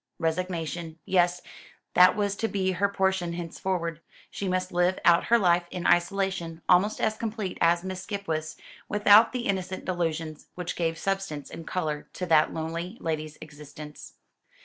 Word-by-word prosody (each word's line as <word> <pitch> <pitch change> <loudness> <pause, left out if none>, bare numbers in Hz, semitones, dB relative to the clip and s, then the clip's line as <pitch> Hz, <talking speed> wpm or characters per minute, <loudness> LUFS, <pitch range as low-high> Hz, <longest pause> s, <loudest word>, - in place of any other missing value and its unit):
Resignation. 165 -1 -3
Yes, 180 -1 +2 0.5
that 180 +1 +7
was 205 -1 0
to 225 - 0
be 190 -3 0
her 200 +2 +1
portion 190 -3 0
henceforward. 170 -1 -3 0.3
She 200 - -4
must 185 0 -1
live 180 +1 +2
out 170 0 +5
her 235 - +5
life, 175 -4 +3
in 180 -1 -5
isolation 175 -2 +1
almost 185 +4 +4
as 215 - +1
complete 215 -4 -4
as 170 +1 +3
Miss 185 -1 -5
Skipwith's, 165 -7 -4 0.3
without 210 +2 +6
the 250 - -2
innocent 185 -1 -2
delusions 165 -3 -3
which 180 0 -4
gave 165 -1 -1
substance 195 -8 -3
and 165 -1 -9
colour 155 -5 -3
to 180 - -4
that 160 -3 +4
lonely 170 +5 -4
lady's 155 -1 -3
existence. 150 0 -11
180 Hz, 150 wpm, -27 LUFS, 165-190 Hz, 0.5 s, that